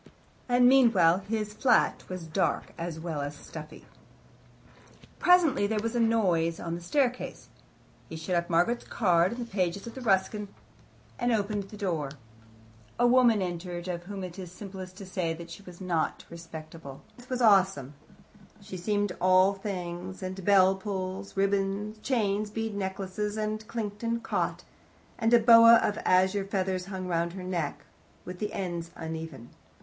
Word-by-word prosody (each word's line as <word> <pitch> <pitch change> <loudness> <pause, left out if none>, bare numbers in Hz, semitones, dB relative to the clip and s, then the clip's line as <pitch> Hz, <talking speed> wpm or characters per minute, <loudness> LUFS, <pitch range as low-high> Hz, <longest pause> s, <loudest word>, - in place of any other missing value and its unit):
And 245 0 +5
meanwhile, 225 -10 +5
his 210 +1 -3
flat 245 +1 +2
was 185 -2 -5
dark, 160 +4 -1
as 165 -1 -5
well 160 -3 -4
as 145 +1 -4
stuffy. 155 +1 -10 1.3
Presently 330 - +4
there 215 0 -1
was 230 +1 -2
a - - +1
noise 185 -8 +2
on 165 -1 -4
the 170 - -5
staircase. 250 +7 -1 0.6
He - - -7
shut 160 +3 -4
up 170 0 0
Margaret's 175 +9 +2
card 175 -4 +2
in - - -8
the 240 - -4
pages 195 -3 -2
of 240 +2 -8
Ruskin, 205 0 +1 0.7
and 240 0 +1
opened 205 -2 0
the 210 +2 -11
door. 165 -8 -2 0.9
A 240 - +3
woman 240 -4 +5
entered, 175 0 -5
of 175 -1 -4
whom 195 0 -6
it 180 +1 -7
is 180 -2 -7
simplest 185 -1 -9
to 200 - -8
say 180 -3 -2
that 170 0 -10
she 165 - -9
was 180 -3 -13
not 180 -4 -1
respectable. 160 -3 -9
Her - - -13
appearance 250 0 -18
was 255 -1 -2
awesome. 190 - +4 0.7
She 200 -2 -8
seemed 205 +2 0
all 185 +1 +5
strings 185 -1 -5
and 185 +1 -5
bell 190 -1 +5
pulls 190 0 -5
ribbons, 200 +2 0
chains, 215 -4 0
bead 225 0 -3
necklaces 195 +1 -3
that 215 0 -3
clinked 210 -3 -4
and 230 0 -2
caught 175 -5 -2 0.6
and 225 -1 +2
a 240 - +8
boa 230 0 +8
of 210 -2 +1
azure 190 +2 +3
feathers 190 -2 -2
hung 190 -2 -5
round 170 -1 -1
her 185 -1 -7
neck, 175 -5 -3 0.4
with 180 0 -8
the 210 -1 -2
ends 170 -3 -4
uneven. 160 -6 -7
190 Hz, 160 wpm, -28 LUFS, 175-215 Hz, 1.3 s, a